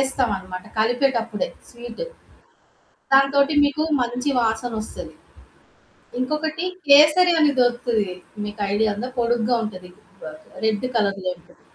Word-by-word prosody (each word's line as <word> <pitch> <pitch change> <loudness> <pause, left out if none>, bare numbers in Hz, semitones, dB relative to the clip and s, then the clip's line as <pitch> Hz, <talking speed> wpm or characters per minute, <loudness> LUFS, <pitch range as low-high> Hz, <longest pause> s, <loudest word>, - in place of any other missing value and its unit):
ఏస్తామనమాట. 200 -9 -2
కలిపేటప్పుడే 235 0 0 0.2
sweet. 240 - -8 1.1
దాంతోటి 275 +2 +4
మీకు 285 +1 0 0.2
మంచి 250 +4 -2
వాసనొస్తది. 225 -1 -3 1.1
ఇంకొకటి 310 +5 -2 0.2
కేసరి 305 +5 +7
అనేదొరుకుతది. 245 -8 +1 0.3
మీకు 210 0 -7
ఐడియా 215 0 +2
ఉందా? 245 +5 -5
పొడుగ్గా 240 0 +1
ఉంటది. 185 -4 -7 0.8
రెడ్డు 220 +2 0
కలర్‌లో 200 -4 0
ఉంటది. 175 +1 -23
240 Hz, 90 wpm, -22 LUFS, 215-275 Hz, 1.1 s, కేసరి